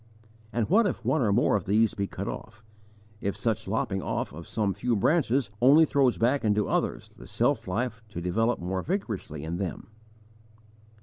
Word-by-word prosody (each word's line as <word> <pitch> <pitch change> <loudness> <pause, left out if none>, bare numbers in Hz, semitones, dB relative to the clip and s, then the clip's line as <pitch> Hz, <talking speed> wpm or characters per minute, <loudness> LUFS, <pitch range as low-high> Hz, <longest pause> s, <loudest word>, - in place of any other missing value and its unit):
And 115 -1 0
what 210 +4 +4
if - - -4
one 155 - +2
or 110 -4 +2
more 110 +2 +3
of 100 - -1
these 110 +2 +3
be 100 0 -2
cut - - -6
off, 105 - -7 0.6
if 100 -1 -3
such 110 -1 -1
lopping 95 -3 -1
off - - -3
of 85 +2 -9
some 105 -3 0
few 120 +3 0
branches 130 - +2
only 145 +6 +7
throws 135 -4 +2
back 125 +4 +2
into 105 -1 +2
others - - -1
the - - -14
self - - 0
life 115 +4 -2
to 95 - -6
develop 115 +7 +1
more 95 +2 -2
vigorously 110 - -4
in 80 +2 -3
them? 95 +2 -5
110 Hz, 180 wpm, -27 LUFS, 95-125 Hz, 0.6 s, only